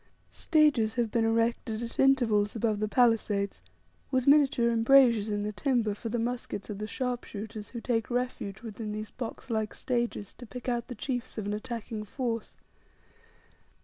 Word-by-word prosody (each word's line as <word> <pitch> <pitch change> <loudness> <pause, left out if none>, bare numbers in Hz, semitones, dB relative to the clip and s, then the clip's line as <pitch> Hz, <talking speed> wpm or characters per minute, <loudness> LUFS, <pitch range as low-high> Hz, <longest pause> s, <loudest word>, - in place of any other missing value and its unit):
Stages 290 -9 +3
have 235 -3 0
been 230 -1 +2
erected 230 0 0
at 230 - -7
intervals 235 -7 +3
above 220 -2 0
the 215 - 0
palisades 215 -4 +2 0.5
with 255 -2 +1
miniature 275 -5 +5
embrasures 230 -2 +5
in 205 -1 -1
the 210 - -2
timber, 230 -2 +1
for 225 +3 -6
the 240 - -1
muskets 235 -3 -3
of 200 - -6
the 215 - -3
sharpshooters, 220 -4 -4
who 235 - -6
take 225 -2 0
refuge 245 -5 -3
within 215 -1 -5
these 215 0 -5
box 245 +1 -6
like 220 -1 -1
stages 240 -5 -2
to 245 - -9
pick 250 +3 -8
out 240 -1 -1
the 245 - -6
chiefs 245 +1 -4
of 215 - -3
an 205 - -1
attacking 220 0 -5
force. 230 +1 -4
230 Hz, 165 wpm, -29 LUFS, 215-245 Hz, 0.5 s, miniature